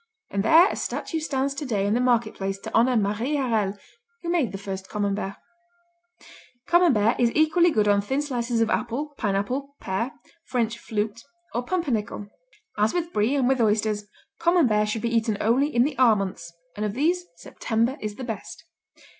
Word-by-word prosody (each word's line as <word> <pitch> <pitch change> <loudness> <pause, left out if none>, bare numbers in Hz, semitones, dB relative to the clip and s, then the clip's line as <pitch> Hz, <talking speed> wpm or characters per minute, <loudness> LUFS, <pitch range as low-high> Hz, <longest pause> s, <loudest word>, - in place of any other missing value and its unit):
And 200 - 0
there 320 - +6
a - - -3
statue 325 - -3
stands 275 -3 -1
today 245 -9 -2
in 205 - +1
the 240 - +2
market 240 -3 +2
place 195 0 -3
to 225 - -8
honor 240 +2 +4
Marie 220 +7 0
Harel 220 -7 0 0.5
who 340 - -2
made 305 - +1
the 195 - -5
first 190 -1 -6
Camembert. 200 -1 -2 1.3
Camembert 280 - +3
is 240 -1 +3
equally 315 +3 +4
good 215 -9 +2
on 200 0 +4
thin 265 +8 -1
slices 240 -4 -1
of 220 -1 +1
apple, 275 +5 -2
pineapple, 245 +7 -2
pear, 195 +7 -2 0.3
French 235 -2 -1
"flute" 215 +1 -3 0.3
or 240 - -1
pumpernickel. 245 - -2 0.5
As 210 +7 +2
with 345 -1 -2
Brie 215 +7 +2
and 265 -3 +2
with 260 -1 +2
oysters, 215 -1 +1 0.3
Camembert 305 -12 +3
should 215 0 -3
be 235 0 0
eaten 220 -2 +1
only 250 +6 +2
in 240 -5 +2
the 285 +1 -1
"R" 240 -4 +6
months, 190 -4 -4 0.2
and 210 - -3
of 210 -1 -1
these 340 +7 +1
September 230 +3 -1
is 210 -1 -4
the 260 - -7
best. 225 -4 -7
230 Hz, 175 wpm, -25 LUFS, 210-275 Hz, 1.3 s, there